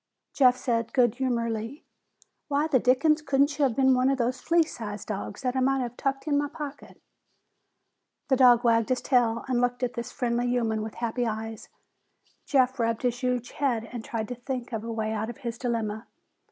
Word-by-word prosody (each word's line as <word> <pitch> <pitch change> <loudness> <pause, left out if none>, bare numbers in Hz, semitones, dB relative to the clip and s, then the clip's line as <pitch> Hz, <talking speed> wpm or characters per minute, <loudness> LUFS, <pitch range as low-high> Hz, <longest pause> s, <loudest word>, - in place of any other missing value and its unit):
Jeff 255 -2 +5
said 230 -3 -1
good 240 -4 +4
humoredly, 235 +1 -2 0.6
"Why 290 0 +1
the 295 -5 +3
dickens 280 +6 +3
couldn't 285 0 +1
you - - +3
have 250 -4 0
been 265 0 +4
one 255 +1 +3
of 275 - +1
those 250 +1 -1
flea 335 0 +3
sized 215 -9 -7
dogs 205 0 -5
that 250 0 -1
I - - +1
might 270 +1 +2
have 240 0 -6
tucked 270 +1 -2
in 285 -1 +2
my 290 0 -1
pocket?" 290 -2 -8 1.3
The 265 - +5
dog 245 -2 +6
wagged 230 -1 +3
his 255 - +1
tail 235 -3 +1
and 250 -2 +1
looked 245 +1 0
at 250 0 -1
this 235 -1 -5
friendly 240 0 -1
human 230 -3 0
with 220 0 -6
happy 235 +1 -1
eyes. 220 0 -5 0.8
Jeff 260 -2 +2
rubbed 230 0 0
his 245 -1 0
huge 250 -2 -1
head 240 -6 -1
and 240 -2 -6
tried 220 -2 -4
to 250 - -4
think 250 0 -5
a 225 - -1
way 220 -1 -3
out 220 +1 -2
of 240 - -7
his 235 -3 -6
dilemma. 225 -3 -2
245 Hz, 195 wpm, -27 LUFS, 230-265 Hz, 1.3 s, dog